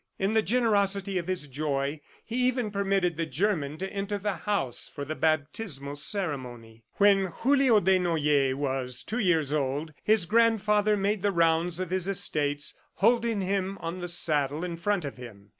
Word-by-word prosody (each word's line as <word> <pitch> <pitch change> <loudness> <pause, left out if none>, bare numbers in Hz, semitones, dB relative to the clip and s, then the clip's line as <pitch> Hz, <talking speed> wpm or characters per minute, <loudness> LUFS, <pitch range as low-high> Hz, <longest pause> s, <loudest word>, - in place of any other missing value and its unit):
In 195 +3 0
the 220 - +4
generosity 200 -4 +1
of 170 - -6
his 185 -5 -2
joy, 140 +1 -2 0.2
he 235 - -4
even 250 -4 -1
permitted 195 -4 0
the 165 -1 -2
German 155 -2 -1
to 190 +2 -5
enter 200 +1 -2
the 205 0 -2
house 195 - -2
for 140 - -6
the 155 - -3
baptismal 155 -1 -2
ceremony. 125 - -3
When 200 -1 +4
Julio 260 +4 +3
Desnoyers 160 -8 +2
was 130 -3 -2
two 235 - -3
years 165 - +1
old, 145 +2 -2
his 215 -4 +3
grandfather 215 -1 +3
made 200 0 0
the 205 +1 +1
rounds 170 0 +2
of 185 -2 -4
his 185 -1 0
estates, 145 -6 0 0.2
holding 230 0 +2
him 195 0 -1
on 170 +1 -5
the 175 - -4
saddle 155 -3 +1
in 175 -1 -3
front 180 0 -1
of 140 - -6
him. 105 -5 -12
180 Hz, 165 wpm, -27 LUFS, 145-205 Hz, 0.2 s, the